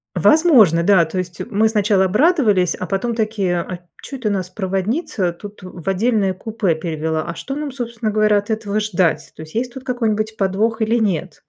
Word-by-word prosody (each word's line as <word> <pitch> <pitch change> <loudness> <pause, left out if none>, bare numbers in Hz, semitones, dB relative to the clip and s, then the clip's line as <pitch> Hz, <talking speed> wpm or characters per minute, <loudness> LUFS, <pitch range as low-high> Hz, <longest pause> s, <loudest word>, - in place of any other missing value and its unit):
Возможно, 250 - +5
да. 185 -2 +5
То 160 +4 -6
есть 180 -1 -6
мы 220 +1 +2
сначала 205 -3 +2
обрадовались, 210 - +3
а - - -5
потом 205 +5 -2
такие, 210 -5 0
а 175 +1 -6 0.2
чё 275 - -7
это 240 -4 -2
нас 190 -3 -2
проводница 190 - -2
тут 205 +4 -11
в 180 -2 -11
отдельное 200 0 +1
купе 205 -3 -1
перевела? 160 -1 -2
А 170 - -5
что 270 +10 -6
нам, 295 -1 -4
собственно 235 -3 -3
говоря, 215 0 +3
от 205 +1 -3
этого 215 -1 -1
ждать? 185 -5 0
То - - -10
есть, 155 +4 -14
есть 245 +1 -2
тут 265 0 -10
какой-нибудь 220 -3 -1
подвох 215 +4 0
или 225 +2 +2
нет? 185 -7 -2
205 Hz, 190 wpm, -19 LUFS, 185-225 Hz, 0.2 s, Возможно